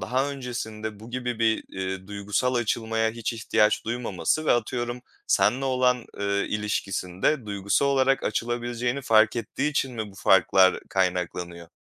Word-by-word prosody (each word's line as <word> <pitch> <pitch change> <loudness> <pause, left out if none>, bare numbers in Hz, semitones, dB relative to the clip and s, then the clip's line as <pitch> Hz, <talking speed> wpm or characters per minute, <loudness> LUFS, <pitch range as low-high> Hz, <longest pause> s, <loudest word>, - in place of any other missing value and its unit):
daha 135 +3 0
öncesinde 110 -5 -5
bu 115 +2 -11
gibi 125 -2 -3
bir, 110 -1 +1
eee, 95 0 -5
duygusal 105 +5 -1
açılmaya 110 -1 0
hiç 115 +1 -3
ihtiyaç 110 -1 +1
duymaması 120 - -1
ve - - +5
atıyorum 120 +1 -2 0.3
seninle 125 +6 +2
olan, 125 -2 +1
eee, 100 0 0
ilişkisinde 105 +3 -1
duygusal 100 +7 +1
olarak 135 -1 +2
açılabileceğini 120 +3 -2
fark 110 -1 +4
ettiği 140 +5 -2
için 135 -3 -1
mi 110 -3 -4
bu - - -17
farklar 95 0 +4
kaynaklanıyor? 90 -2 -2
115 Hz, 135 wpm, -26 LUFS, 100-125 Hz, 0.3 s, ve